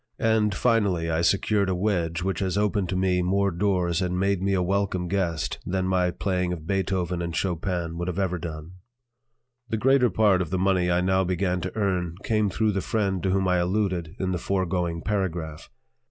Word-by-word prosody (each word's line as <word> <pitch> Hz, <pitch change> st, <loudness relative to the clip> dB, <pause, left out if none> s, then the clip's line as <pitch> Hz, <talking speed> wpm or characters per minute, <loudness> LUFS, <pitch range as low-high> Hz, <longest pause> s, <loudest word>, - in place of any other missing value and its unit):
And, 110 Hz, -3 st, +2 dB
finally, 100 Hz, -9 st, +1 dB
I 80 Hz, +1 st, +1 dB
secured 100 Hz, +3 st, +2 dB
a 95 Hz, -, 0 dB
wedge 90 Hz, -3 st, -1 dB
which 95 Hz, -2 st, -1 dB
has 95 Hz, 0 st, -1 dB
opened 105 Hz, -3 st, 0 dB
to 95 Hz, -, -1 dB
me 90 Hz, -1 st, +2 dB
more 100 Hz, +2 st, +1 dB
doors 90 Hz, -1 st, 0 dB
and 90 Hz, 0 st, -1 dB
made 100 Hz, -1 st, +1 dB
me 100 Hz, 0 st, +1 dB
a 90 Hz, -, +1 dB
welcome 95 Hz, -1 st, 0 dB
guest 85 Hz, -5 st, -1 dB
than 95 Hz, 0 st, -1 dB
my 90 Hz, -1 st, +2 dB
playing 90 Hz, 0 st, -1 dB
of 80 Hz, -3 st, -5 dB
Beethoven 95 Hz, -2 st, -1 dB
and 85 Hz, -1 st, -3 dB
Chopin 85 Hz, -2 st, -2 dB
could 85 Hz, +1 st, -2 dB
ever 90 Hz, 0 st, -1 dB
have -, -, -11 dB
done. 80 Hz, 0 st, -6 dB, 1.0 s
The 110 Hz, -, 0 dB
greater 130 Hz, +1 st, +4 dB
part 105 Hz, -5 st, +3 dB
of 85 Hz, -, -3 dB
the 95 Hz, -, -1 dB
money 90 Hz, -1 st, +2 dB
I 90 Hz, 0 st, +2 dB
now 95 Hz, +1 st, +2 dB
began 90 Hz, 0 st, -1 dB
to 90 Hz, +1 st, -5 dB
earn 90 Hz, -5 st, 0 dB
came 105 Hz, -2 st, +1 dB
through 110 Hz, +3 st, +1 dB
the 95 Hz, -1 st, -1 dB
friend 100 Hz, -4 st, -1 dB
to 95 Hz, -, 0 dB
whom 95 Hz, 0 st, +1 dB
I 90 Hz, 0 st, +3 dB
alluded 90 Hz, -2 st, -1 dB
in 95 Hz, -1 st, -1 dB
the 90 Hz, -, -1 dB
foregoing 90 Hz, -3 st, -1 dB
paragraph. 85 Hz, -7 st, -3 dB
95 Hz, 195 wpm, -25 LUFS, 90-100 Hz, 1.0 s, greater